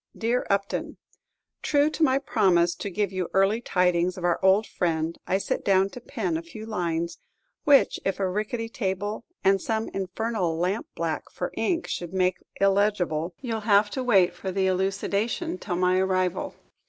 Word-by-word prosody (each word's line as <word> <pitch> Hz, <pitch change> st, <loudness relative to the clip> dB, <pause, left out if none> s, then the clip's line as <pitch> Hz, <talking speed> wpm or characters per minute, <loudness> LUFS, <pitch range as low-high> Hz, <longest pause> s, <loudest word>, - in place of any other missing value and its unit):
Dear 240 Hz, +2 st, 0 dB
Upton, 200 Hz, 0 st, -1 dB, 0.6 s
True 295 Hz, +1 st, +2 dB
to 320 Hz, -, -6 dB
my 265 Hz, -4 st, +4 dB
promise 175 Hz, -10 st, +2 dB
to 200 Hz, -, -5 dB
give 200 Hz, +1 st, -1 dB
you 185 Hz, -2 st, -3 dB
early 195 Hz, +4 st, +3 dB
tidings 180 Hz, -3 st, +1 dB
of 180 Hz, -, -7 dB
our 175 Hz, -1 st, +1 dB
old 190 Hz, +3 st, +5 dB
friend, 165 Hz, -4 st, -1 dB
I 190 Hz, -, +2 dB
sit 195 Hz, -, -2 dB
down 195 Hz, 0 st, +3 dB
to 245 Hz, -, -9 dB
pen 195 Hz, -, -2 dB
a -, -, -4 dB
few 215 Hz, +6 st, -10 dB
lines, 170 Hz, -5 st, -2 dB, 0.5 s
which 285 Hz, -2 st, +5 dB
if 195 Hz, -, -1 dB
a 195 Hz, -, +1 dB
rickety 215 Hz, +4 st, -2 dB
table 205 Hz, 0 st, -3 dB, 0.2 s
and 195 Hz, -1 st, +4 dB
some 220 Hz, -1 st, -2 dB
infernal 190 Hz, -2 st, -2 dB
lampblack 195 Hz, -, -2 dB
for -, -, -4 dB
ink 345 Hz, -2 st, 0 dB
should 175 Hz, +1 st, -5 dB
make 185 Hz, -1 st, +1 dB, 0.2 s
illegible, 190 Hz, -5 st, +1 dB
you 240 Hz, -4 st, -3 dB
'll 215 Hz, 0 st, -8 dB
have 205 Hz, 0 st, +4 dB
to 260 Hz, -, -2 dB
wait 190 Hz, -8 st, +4 dB
for 190 Hz, +1 st, -5 dB
the 190 Hz, 0 st, 0 dB
elucidation 200 Hz, -, -1 dB
till 180 Hz, -, -3 dB
my 180 Hz, +1 st, +2 dB
arrival. 185 Hz, -1 st, 0 dB
195 Hz, 170 wpm, -26 LUFS, 180-220 Hz, 0.6 s, old